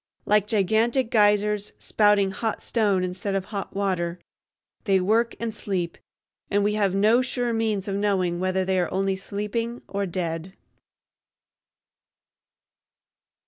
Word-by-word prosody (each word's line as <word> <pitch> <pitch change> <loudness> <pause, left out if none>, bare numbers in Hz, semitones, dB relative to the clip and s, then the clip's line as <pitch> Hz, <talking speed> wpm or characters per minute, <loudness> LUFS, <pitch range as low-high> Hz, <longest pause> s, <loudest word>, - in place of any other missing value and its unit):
Like 210 -1 +3
gigantic 220 +4 +1
geysers, 210 -1 +2
spouting 205 -2 +3
hot 220 +2 -3
stone 205 -5 +1
instead 185 +2 -3
of 190 -1 -1
hot 200 -2 -6
water, 180 -3 -1 0.7
they 195 -3 +3
work 225 +5 +1
and 230 -1 -3
sleep, 185 -5 -3 0.5
and 205 0 +2
we 210 +1 +1
have 200 -3 +1
no 215 +5 +4
sure 245 -2 -1
means 220 -3 -1
of 195 - -2
knowing 190 -4 0
whether 185 0 0
they 190 0 +1
are 175 - -1
only 195 0 0
sleeping 210 +5 -4
or 200 0 -2
dead. 170 0 -4
200 Hz, 130 wpm, -25 LUFS, 190-215 Hz, 0.7 s, no